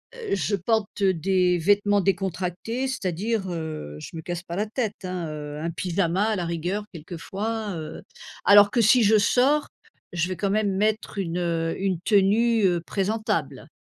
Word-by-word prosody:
heu, 465 - -2
je 200 +1 0
porte 205 +1 -1
des 185 0 +2
vêtements 205 +3 +3
décontractés, 190 +6 -2
c'est-à-dire, 200 -2 -2
heu, 155 - -5
je - - -8
me 160 - -5
casse 175 -1 -5
pas 170 -1 -6
la 210 - 0
tête, 215 -3 -4
hein, 180 -2 -3
heu, 150 -1 -6
un 165 +2 -3
pyjama 180 +2 0
à 215 - +1
la 180 - -2
rigueur 175 +5 -2
quelquefois, 200 +6 -4
heu. 155 0 -7 0.4
Alors 205 0 +8
que 240 - +2
si 225 +2 +5
je 215 +1 +5
sors, 265 +8 +3 0.5
je 175 -1 0
vais 185 - -3
quand 200 - -1
même 205 -2 +1
mettre, 215 +1 -1
une, 175 -3 -2
heu, 165 -2 -1
une 190 -3 0
tenue, 215 +3 +3
heu, 175 -2 +2
présentable. 210 +5 -2
195 Hz, 170 wpm, -25 LUFS, 175-215 Hz, 0.5 s, Alors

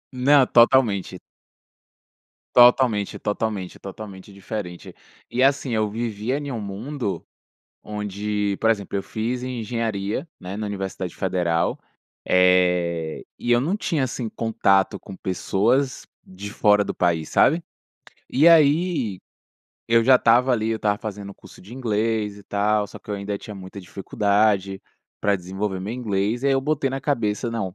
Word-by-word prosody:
Não, 135 +2 +5
totalmente. 115 -7 +3 1.4
Totalmente, 120 -4 +5
totalmente, 105 -3 -3
totalmente 100 0 -9
diferente. 100 -2 -7 0.4
E 125 - 0
assim, 135 -1 +2
eu 110 -1 +1
vivia 115 +3 -2
em 145 -1 -5
um 115 -4 -4
mundo, 100 - -4 0.6
onde 105 -1 -2
por 115 - +3
exemplo 100 -3 -1
eu 100 - -3
fiz 120 +3 -3
em 125 -1 -4
engenharia, 110 0 -2
né, 95 +2 -7
na 105 0 -4
universidade 95 -3 -4
federal, 90 -3 0 0.5
eh, 90 -3 +2
e 120 - -2
eu 120 - +5
não 160 +10 0
tinha 160 -9 -1
assim 120 -2 -4
contato 100 -4 +1
com 95 0 -11
pessoas 120 +8 0 0.2
de 95 +2 -9
fora 105 -2 +4
do - - -3
país 85 -3 0
sabe? 165 +4 +3 0.7
E 150 +6 +4
aí, 150 - +3 0.7
eu 115 0 +4
já 130 +3 +6
estava 125 +2 +4
ali, 110 -2 0
eu 115 - 0
estava 105 -1 0
fazendo 105 -3 -7
curso - - -16
de 105 +6 -12
inglês 110 -4 -1
e - - -13
tal, 105 +1 0
só 105 - -11
que - - -12
eu - - -1
ainda 100 0 -4
tinha 105 +1 -9
muita 95 0 -10
dificuldade 100 +1 0 0.4
pra 100 -1 +2
desenvolver 95 +1 -4
meu 100 +4 -4
inglês. 110 -1 -1
E - - +1
aí 140 - +4
eu 135 - +2
botei 145 -1 0
na 135 +1 -4
cabeça 115 -5 -1
"não, 105 -6 -3
105 Hz, 150 wpm, -23 LUFS, 95-120 Hz, 1.4 s, já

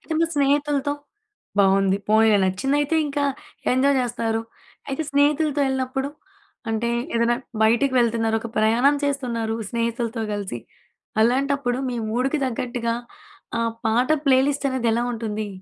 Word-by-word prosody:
అయితే 320 - -7
మీ 330 - +3
స్నేహితులతో 285 0 +1 0.7
బావుంది. 195 0 +4
పోనీలే 215 -1 +5
నచ్చిందయితే 275 - +1
ఇంకా 285 0 -1 0.5
ఎంజాయ్ 275 +2 +3
జేస్తారు. 230 -2 -1 0.5
అయితే 275 +3 -2
స్నేహితులతో 290 +1 +2
యెళ్ళినప్పుడు, 265 +1 -1 0.6
అంటే, 225 +1 -1 0.3
ఏదన్నా 235 +1 +2 0.3
బైటికి 240 +5 +3
వెళ్తున్నారు, 225 -1 +2
ఒక 235 - -6
ప్రయాణం 235 +7 +4
చేస్తున్నారు, 240 -6 -1 0.2
స్నేహితులతో 230 0 -2
గలిసి. 200 -11 -4 0.6
అలాంటప్పుడు 260 +1 +1
మీ 245 - -3
మూడుకి 260 +6 0
తగ్గట్టుగా, 240 -1 -2 0.6
ఆ - - +1 0.3
పాట 240 +3 +2 0.2
ప్లేలిస్టనేది 265 -2 +2
ఎలా 235 - +1
ఉంటుందీ? 215 -2 -3
245 Hz, 115 wpm, -23 LUFS, 225-275 Hz, 0.7 s, పోనీలే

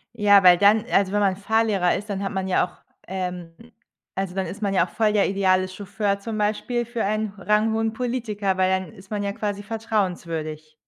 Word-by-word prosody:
Ja, 205 -3 +5
weil 180 -1 +8
dann, 210 +3 +4
also, 195 -1 +3
wenn 205 - +1
man 195 -2 +2
Fahrlehrer 205 -3 +1
ist, 210 +2 -6
dann 200 -1 -3
hat 195 - -2
man 190 -1 -2
ja 185 - +2
auch, - - -20 0.3
ähm 180 -3 -5 0.6
also, 195 -1 -3
dann 190 0 -2
ist 210 +3 -7
man 200 -1 0
ja 185 -3 +3
auch - - -16
voll 215 +2 +1
der 205 -2 +3
ideale 185 -1 +2
Chauffeur 200 +1 -2
zum 215 +1 -5
Beispiel 220 +3 -1
für 235 -1 -3
einen 215 0 -1
ranghohen 220 +3 +1
Politiker, 220 -5 -2
weil 185 0 +3
dann 185 -3 -1
ist 190 +1 -16
man 210 -1 -2
ja 200 0 -1
quasi 205 0 -3
vertrauenswürdig. 175 -8 -3
200 Hz, 205 wpm, -23 LUFS, 185-215 Hz, 0.6 s, weil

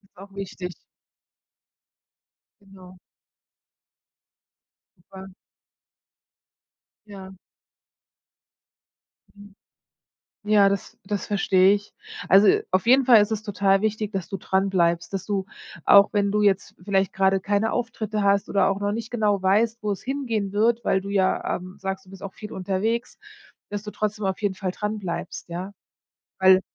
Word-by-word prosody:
Auch 195 +2 -13
wichtig. 180 -2 -6 1.9
Genau. 185 -2 -16 2.0
Super. 190 +2 -13 1.8
Ja. 190 -2 -11 2.0
Mhm. 205 -1 -15 0.9
Ja 205 -1 +4
das 200 -1 -4
das 205 0 -4
verstehe 195 -1 +3
ich. 205 0 -9 0.3
Also, 195 +3 +6 0.2
auf 185 +4 +1
jeden 260 +2 +5
Fall 235 -4 +7
ist 205 +2 -1
es 215 0 -2
total 200 -2 +1
wichtig, 215 -1 -2
dass 190 -5 -4
du 195 - -5
dranbleibst, 185 -2 0
dass 190 -1 -3
du, 195 -2 -2 0.4
auch 200 0 +7
wenn 200 -1 +1
du 210 0 +1
jetzt 200 -2 +1
vielleicht 195 0 0
gerade 190 0 +2
keine 205 +3 0
Auftritte 220 -3 -3
hast 200 0 +2
oder 200 - +2
auch 195 +1 -2
noch 205 0 -1
nicht 225 +1 -5
genau 210 -4 +1
weißt, 220 +4 +1
wo 210 - -1
es 195 - -4
hingehen 235 -7 -3
wird, 225 +3 +1
weil 190 - +2
du 200 - -7
ja, 190 -2 0
ähm, 185 +2 -11
sagst: 190 0 -5
„Du 185 - -19
bist 195 0 -12
auch 195 - -7
viel 210 0 -10
unterwegs“, 200 +5 -2 0.5
dass 205 0 -5
du 210 - -7
trotzdem 215 -1 -3
auf 190 +2 -2
jeden 200 -2 -1
Fall 185 -1 -3
dranbleibst, 205 -5 -5
ja? 185 +4 -6 0.7
Weil 190 0 +6
200 Hz, 140 wpm, -24 LUFS, 190-210 Hz, 2.0 s, Fall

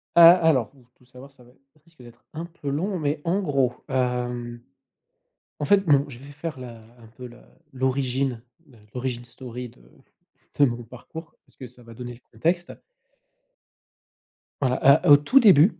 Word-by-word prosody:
Ah, 170 0 +10
alors, 155 -10 +2
ouh, 125 -3 -23
tout 125 - -26
savoir 130 +2 -14
ça 125 -2 -21
va 120 - -20
ê - - -26 0.2
ça - - -28
risque 165 -6 -21
d'être 120 0 -16
un 165 +2 -5
peu 165 -4 -8
long 180 +7 -2
mais 150 0 -2
en 190 +4 +1
gros, 135 -7 0 0.2
hem, 125 -2 -2 1.0
en 145 - -2
fait, 200 +1 +3
non, 140 -1 +4
je 120 -2 -11
vais 140 +1 -12
faire 150 0 -6
la 120 -2 -9 0.2
un 115 - -15
peu 125 +3 -11
la 120 0 -17 0.3
l'origine 130 -1 -1 0.2
le 125 -5 -21 0.2
l'origine 125 -1 -4
story 125 0 -9
de - - -22 0.8
de 145 - +7
mon 120 -1 -3
parcours 160 +8 -11
parce - - -31
que 130 - -9
ça 125 0 -18
va 115 0 -13
donner 120 +1 -8
le 120 - -15
contexte. 170 +10 -1 1.9
Voilà, 135 +1 +4
heu, - - +3
au 145 - +10
tout 255 - +4
début, 190 - +5
130 Hz, 180 wpm, -24 LUFS, 120-150 Hz, 1.9 s, Ah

